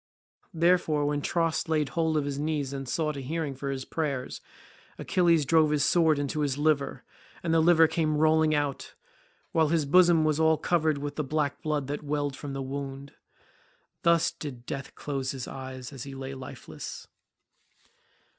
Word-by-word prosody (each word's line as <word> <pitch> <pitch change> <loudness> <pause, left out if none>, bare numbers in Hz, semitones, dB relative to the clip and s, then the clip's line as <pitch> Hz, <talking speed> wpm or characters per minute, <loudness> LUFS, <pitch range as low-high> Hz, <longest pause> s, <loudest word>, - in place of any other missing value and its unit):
Therefore 165 -3 +3
when 145 0 0
Tros 165 +1 0
laid 155 -3 +1
hold 160 -2 0
of 145 - 0
his 140 -1 -3
knees 145 -3 -2
and 135 -2 -5
sought 155 -1 -1
a - - -4
hearing 150 +1 -3
for 140 +1 -5
his 135 -1 -4
prayers, 140 -5 -3 0.6
Achilles 170 -4 +2
drove 160 +1 +4
his 150 -2 +2
sword 160 -3 +4
into 145 +2 -2
his 145 -2 0
liver, 145 -2 0 0.4
and 165 -2 0
the 165 - +5
liver 165 0 +6
came 155 -2 0
rolling 155 0 +4
out, 145 -2 -2 0.6
while 160 -1 +3
his 160 -1 +1
bosom 170 +1 +5
was 155 0 +1
all 160 0 +4
covered 155 -1 +1
with 145 +1 -5
the 155 - 0
black 145 0 -1
blood 150 -3 -1
that 145 +2 -4
welled 145 -2 -2
from 140 0 -7
the 135 0 -3
wound. 140 +1 -6 0.9
Thus 170 -1 +3
did 125 -5 -8
death 140 +1 -6
close 135 -3 -3
his 130 -3 -4
eyes 130 -1 -7
as 135 - -8
he 140 +2 -7
lay 135 0 -6
lifeless. 130 -1 -8
150 Hz, 175 wpm, -28 LUFS, 140-160 Hz, 0.9 s, liver